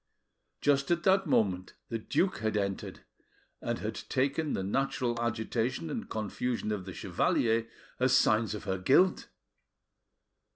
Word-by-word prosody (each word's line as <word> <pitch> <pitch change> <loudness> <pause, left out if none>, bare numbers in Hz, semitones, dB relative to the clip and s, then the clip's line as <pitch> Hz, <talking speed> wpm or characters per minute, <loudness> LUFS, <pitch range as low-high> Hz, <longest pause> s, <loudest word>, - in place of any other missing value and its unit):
Just 140 -1 +2
at 170 0 +1
that 190 0 +4
moment 95 -3 +1
the 115 - -2
duke 185 - 0
had 110 -1 0
entered, 100 -1 -3 0.6
and - - -2
had - - -3
taken 140 +3 -1
the 95 - -1
natural 120 +2 -1
agitation 120 +5 -1
and 230 - -4
confusion 110 +1 -2
of 100 -3 -3
the 95 - -7
chevalier 115 0 +1 0.3
as 130 0 +4
signs 110 -2 +2
of 105 - -7
her 95 -2 -2
guilt. 160 - +3
115 Hz, 135 wpm, -30 LUFS, 105-135 Hz, 0.6 s, that